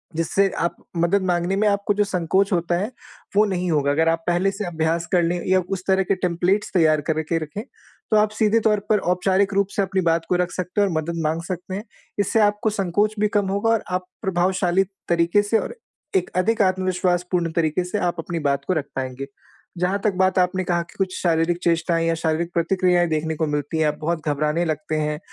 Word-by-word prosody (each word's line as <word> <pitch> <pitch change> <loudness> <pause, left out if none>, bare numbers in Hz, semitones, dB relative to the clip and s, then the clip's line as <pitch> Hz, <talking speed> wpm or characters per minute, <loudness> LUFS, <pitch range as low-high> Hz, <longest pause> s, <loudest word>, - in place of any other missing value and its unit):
जिससे 190 +4 +2
आप 170 - 0 0.2
मदद 170 +4 +2
माँगने 175 +1 0
में 210 +2 +2
आपको 200 0 +1
जो 205 - +3
संकोच 190 +1 0
होता 175 0 +1
है, 210 +6 -3 0.4
वो 210 - +5
नहीं 180 -3 -1
होगा 145 -2 +2
अगर 160 +3 +2
आप 165 0 0
पहले 175 +3 +2
से 200 +1 -5
अभ्यास 165 0 -1
कर 175 -2 +4
लें 175 +1 0
या 185 0 +4
उस 190 -2 -3
तरह 190 0 +3
के 195 - 0
टेम्पलेट्स 180 +3 0
तैयार 155 -4 +3
करके 160 +1 0
रखें, 155 +7 -6 0.5
तो 215 - +5
आप 210 0 +3
सीधे 215 +1 +2
तौर 210 -1 +2
पर 210 -2 +4
औपचारिक 190 +2 +1
रूप 200 0 +2
से - - +2
अपनी 190 0 0
बात 165 -1 +2
को 180 - +2
रख 180 0 0
सकते 185 +3 -2
हैं 200 - +3
और 180 - -3
मदद 165 +1 -2
माँग 160 +2 0
सकते 185 0 -5
हैं, 205 - -5 0.4
इससे 205 +3 +2
आपको 210 +1 +2
संकोच 205 +1 0
भी 210 - +3
कम 200 -2 +1
होगा 200 +3 0
और 225 - +1
आप 180 0 -1 0.2
प्रभावशाली 185 0 +1 0.3
तरीके 170 +4 +3
से 215 +2 +2
और - - -5 0.4
एक 185 -2 +1
अधिक 225 +4 +2
आत्मविश्वासपूर्ण 180 -2 0
तरीके 165 +1 +1
से 195 +4 -3
आप 175 -2 0
अपनी 165 +1 -3
बात 140 0 -1
को 185 - +2
रख 150 -4 -1
पाएँगे। 130 +1 -4 0.5
जहाँ 180 +3 0
तक 210 - +2
बात 185 0 +3
आपने 185 +1 +1
कहा 175 -1 0
कि 170 - -19
कुछ 190 -1 -1
शारीरिक 170 0 +2
चेष्टाएँ 165 0 +1
या 165 - +2
शारीरिक 160 +1 -1
प्रतिक्रियाएँ 175 0 +2
देखने 160 0 -1
को 160 0 -1
मिलती 150 +2 -2
हैं, 155 - +3
आप 150 0 -1
बहुत 160 0 -2
घबराने 150 +3 0
लगते 155 -1 -2
हैं 150 0 -2
180 Hz, 215 wpm, -22 LUFS, 165-195 Hz, 0.5 s, वो